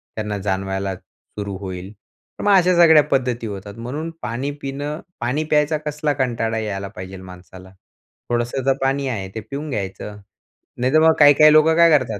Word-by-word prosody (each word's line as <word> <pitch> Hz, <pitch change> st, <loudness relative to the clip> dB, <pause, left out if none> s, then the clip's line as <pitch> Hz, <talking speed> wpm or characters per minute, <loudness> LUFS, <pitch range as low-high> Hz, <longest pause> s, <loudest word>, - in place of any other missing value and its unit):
त्यांना 105 Hz, -1 st, -3 dB
जाणवायला 95 Hz, 0 st, -2 dB
सुरू 100 Hz, +2 st, -9 dB
होईल, 95 Hz, 0 st, -7 dB
तर 105 Hz, -, -16 dB
मग 205 Hz, -, +3 dB
अशा 180 Hz, 0 st, +3 dB
सगळ्या 160 Hz, -3 st, +7 dB
पद्धती 125 Hz, -4 st, -1 dB
होतात. 100 Hz, 0 st, -8 dB
म्हणून 140 Hz, +8 st, -5 dB
पाणी 120 Hz, +6 st, -3 dB
पिणं 145 Hz, +3 st, -4 dB, 0.2 s
पाणी 125 Hz, +6 st, -1 dB
प्यायचा 150 Hz, 0 st, +1 dB
कसला 150 Hz, 0 st, -1 dB
कंटाळा 120 Hz, -4 st, -1 dB
यायला 100 Hz, -3 st, -4 dB
पाहिजेल 95 Hz, 0 st, -8 dB
माणसाला, 95 Hz, 0 st, -13 dB, 0.6 s
थोडंसं 120 Hz, +2 st, -1 dB
तर 135 Hz, -, +4 dB
पाणी 135 Hz, +1 st, 0 dB
आहे, 105 Hz, -7 st, -3 dB
ते -, -, -3 dB
पिऊन 145 Hz, +2 st, -5 dB
घ्यायचं. 105 Hz, -2 st, -5 dB, 0.6 s
नाहीतर 130 Hz, +5 st, +2 dB
मग 160 Hz, -, +6 dB
काही-काही 145 Hz, +1 st, +7 dB
लोकं 155 Hz, +1 st, +5 dB
काय 170 Hz, 0 st, +6 dB
करतात, 115 Hz, -6 st, -4 dB
120 Hz, 160 wpm, -20 LUFS, 100-150 Hz, 0.6 s, सगळ्या